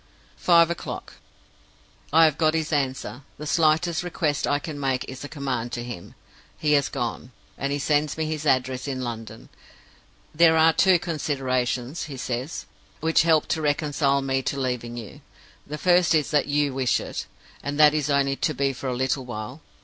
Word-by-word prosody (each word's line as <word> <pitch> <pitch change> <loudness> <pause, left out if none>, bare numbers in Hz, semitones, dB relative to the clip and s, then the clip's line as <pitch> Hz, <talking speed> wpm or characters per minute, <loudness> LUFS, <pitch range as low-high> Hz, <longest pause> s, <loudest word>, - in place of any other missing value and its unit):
"Five 170 -1 +5
o'clock. 170 - -6 1.0
I 165 +2 +7
have 155 -1 +1
got 155 0 +3
his 160 0 -1
answer. 135 -2 -2 0.2
The 150 - -7
slightest 160 +2 +2
request 160 -5 -1
I 145 - +2
can 145 0 -6
make 135 -2 -1
is 130 +1 -8
a 145 - -7
command 130 -5 -3
to 120 -1 -3
him. 120 -8 -8 0.4
He 150 - 0
has 140 -2 +3
gone; 125 -1 -4 0.2
and 140 +1 -3
he 145 - 0
sends 150 +1 0
me 160 - -1
his 155 -1 -3
address 130 0 +1
in 130 -2 -3
London. 115 -2 -7 0.8
'There 160 0 +5
are 160 +1 +5
two 190 +1 +5
considerations' 135 -4 -2
(he 140 -3 -8
says) 125 +4 -4 0.3
'which 160 +1 +3
help 160 -2 +3
to 160 - 0
reconcile 145 -2 +1
me 135 0 0
to 140 +1 -2
leaving 125 -2 -3
you. 115 -3 -9 0.5
The 150 - -5
first 175 0 +4
is 150 -2 +1
that 145 -2 +2
you 145 -1 +1
wish 130 -1 +1
it, - - -6 0.3
and 145 +1 -4
that 150 -1 +7
it - - +1
is 150 -1 -1
only 140 -1 +2
to 155 - -1
be 135 +1 0
for 135 - -6
a 125 - -2
little 130 +1 0
while. 120 +5 -7
145 Hz, 185 wpm, -25 LUFS, 130-155 Hz, 1.0 s, I